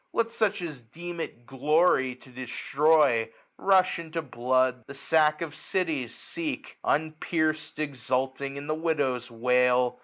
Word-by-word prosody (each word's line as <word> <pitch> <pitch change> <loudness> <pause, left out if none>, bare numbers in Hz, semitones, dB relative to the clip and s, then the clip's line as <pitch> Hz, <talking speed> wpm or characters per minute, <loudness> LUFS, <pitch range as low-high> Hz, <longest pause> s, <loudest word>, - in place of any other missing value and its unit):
]bet 230 0 +1
such 215 -5 0
as 150 -7 -6
deem 170 +9 -8
it 120 -7 -6
glory 135 0 +2
to 130 +1 -18
destroy. 130 0 +2 0.3
Rush 190 -3 +3
into 165 0 -4
blood, 130 -1 +1
ihie 140 - -9
sacjk 155 +2 +2
of 155 -3 -6
cities 160 - -2
so^; 305 -4 -4 0.2
Unpierc'd, 155 0 0
eitculting 135 -1 -2
in 140 +1 -6
the 155 - -1
widow's 145 -6 -1
wail. 125 +1 +2
145 Hz, 130 wpm, -27 LUFS, 125-160 Hz, 0.3 s, Rush